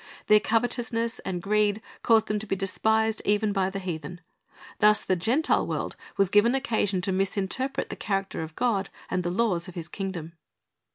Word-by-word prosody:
Their 210 0 +6
covetoLisness 230 0 0
and 180 -2 -4
greed 210 0 +2 0.2
caused 225 -1 +4
them 210 0 0
to 215 - -7
be 195 - 0
despised 220 +3 +1
even 205 0 +1
by 190 -2 +1
the 195 - -5
heathen. 175 -3 -5 0.6
Thus 210 +1 +5
the 185 - +1
Gentile 235 - +1
world - - -3 0.2
was 195 -2 +2
given 230 +5 +5
occasion 220 -8 0
to 190 - 0
misinterpret 195 +8 -1
the - - -4
character 195 -4 -2
of 160 0 -7
God 215 -6 0 0.2
and 185 - +1
the 175 - -2
laws 180 -3 0
of 185 - -10
His 170 -2 -5
kingdom. 175 -4 -5
200 Hz, 175 wpm, -27 LUFS, 185-220 Hz, 0.6 s, Their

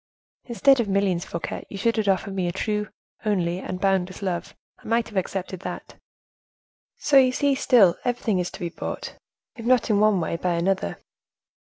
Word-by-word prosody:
"Instead 265 +2 +4
of 235 - +1
millions, 195 -3 +1
Fouquet, 170 - -5
you 200 - -7
should 230 +4 +1
have 215 -2 0
offered 195 0 +1
me 185 -2 -1
a - - 0
true, 210 +3 -2 0.3
only 180 -4 0
and 185 -1 -5
boundless 190 0 0
love: 175 -3 -3 0.2
I - - -14
might 230 +1 +1
have 215 - -14
accepted 190 -1 -3
that. - - -7 1.0
So 280 - +3
you 260 -1 +6
see, 280 +2 +1
still, 235 -9 +5
everything 235 -5 0
is 180 - -1
to - - -11
be 170 - -3
bought, - - -6 0.4
if 230 - -7
not 245 -1 +3
in 205 - +3
one 210 -2 +4
way, 165 0 -2
by 175 0 0
another." 170 - 0
195 Hz, 185 wpm, -24 LUFS, 180-230 Hz, 1.0 s, you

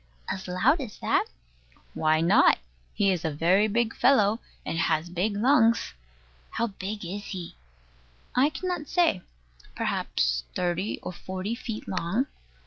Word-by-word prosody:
as 190 - -4
loud 185 - +2
as 230 -6 -7
that? - - +1 0.7
Why 155 0 +2
not? 165 - +5 0.3
He 200 -1 +2
is 180 -2 -1
a 160 - 0
very 175 +8 +3
big 230 +1 0
fellow, 220 -5 +4 0.3
and - - -2
has 165 0 +1
big 200 +4 -1
lungs. 230 - +3 0.6
How 235 - -1
big 205 -1 -5
is 200 +4 -5
he? 180 -4 -6 0.8
I 270 +4 +4
cannot 340 +1 -4
say: 335 - +2 0.5
perhaps - - 0
thirty 180 +3 -1
or - - -4
forty 185 +4 -4
feet 230 -2 -6
long. 190 +7 0
200 Hz, 135 wpm, -27 LUFS, 175-230 Hz, 0.8 s, not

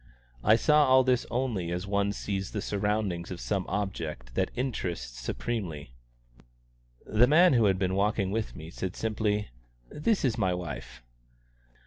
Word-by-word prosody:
I 110 - +6
saw 150 +5 +4
all 130 0 +6
this 125 -1 +1
only 115 -8 -1
as 90 +2 -3
one 100 0 +1
sees 100 -1 -3
the 105 - -2
surroundings 100 -4 -1
of 90 - -6
some 100 -3 -2
object 80 -11 -4
that - - 0
interests 90 - -3
supremely. 75 - -4 1.1
The 115 +3 +4
man 170 +4 +6
who 115 -3 +4
had 95 -2 +3
been 95 -1 0
walking 100 0 +1
with 110 +1 -2
me 80 +2 -9
said 95 0 -4
simply, 105 -1 -1 0.4
"This 190 +3 +1
is 120 -2 0
my 95 -3 +2
wife." 85 -7 -7
100 Hz, 150 wpm, -28 LUFS, 90-115 Hz, 1.1 s, I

